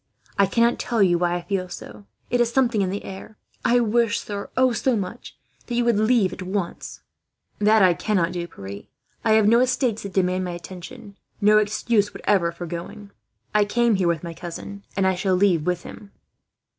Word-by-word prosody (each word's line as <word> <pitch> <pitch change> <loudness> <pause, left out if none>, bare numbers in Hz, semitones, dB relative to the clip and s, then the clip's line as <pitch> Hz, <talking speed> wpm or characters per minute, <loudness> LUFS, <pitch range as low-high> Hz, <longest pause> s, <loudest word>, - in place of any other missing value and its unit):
I 200 - +4
cannot 235 +4 +2
tell 230 -4 +1
you 175 -2 +3
why 175 0 +1
I 175 - -4
feel 185 -1 -2
so. 200 +3 -10 0.2
It 245 0 +3
is 235 -1 +1
something 235 -5 +2
in 190 - 0
the 200 +2 -4
air. 195 +3 -9 0.3
I 245 +1 +4
wish 230 -1 +2
sir, 200 -1 -6
oh, 260 -1 +4
so 255 +1 +1
much! 205 +3 -6 0.3
that 240 - -3
you 240 0 +1
would 235 -3 +3
leave 215 -3 +3
at - - -8
once." 185 -1 -4 0.6
"That 210 0 +5
I 180 -2 +6
cannot 180 -2 0
do, 175 -1 -4
Pierre. 100 - -9 0.4
I 220 - +3
have 215 -1 +4
no 230 +2 +5
estates 250 -3 +1
that 200 -1 -7
demand 185 -1 +1
my 180 -1 -4
attention, 190 +5 -10 0.2
no 210 0 +5
excuse 210 0 0
whatever 180 -5 +1
for 170 +1 -7
going. 175 +5 -7 0.4
I 210 0 +4
came 235 +3 +2
here 190 -3 +1
with 170 -2 0
my 170 -1 -6
cousin, 185 +4 -8
and 195 - +2
shall 190 -1 +1
leave 180 -4 +2
with 180 -1 -1
him." 200 -1 -11
200 Hz, 195 wpm, -23 LUFS, 180-225 Hz, 0.6 s, I